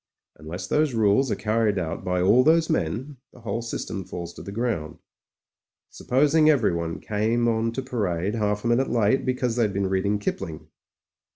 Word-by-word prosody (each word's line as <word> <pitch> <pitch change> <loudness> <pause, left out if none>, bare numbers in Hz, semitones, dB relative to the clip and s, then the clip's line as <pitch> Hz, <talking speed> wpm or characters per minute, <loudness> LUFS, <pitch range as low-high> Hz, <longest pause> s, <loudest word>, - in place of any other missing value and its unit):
Unless 85 +4 -7
those 150 +4 +1
rules 110 +4 +3
are - - 0
carried 110 -2 0
out 85 -3 -3
by 90 0 0
all 120 +7 +5
those 160 +2 +3
men, 125 - -2
the 125 - -17
whole 115 +1 -3
system 110 -4 -5
falls 85 -1 -7
to - - -10
the 100 - -8
ground. 105 -9 -2 0.9
Supposing 150 +4 +3
everyone 85 - +1
came 110 +3 0
on 115 0 +1
to 130 - -3
parade 100 -6 -2
half 105 -2 -1
a - - +2
minute 120 +3 +2
late 115 +3 +1
because 125 -2 -1
they'd 110 -4 +1
been 100 -1 -1
reading 100 +2 +1
Kipling?" 80 -6 -5
110 Hz, 170 wpm, -25 LUFS, 95-125 Hz, 0.9 s, all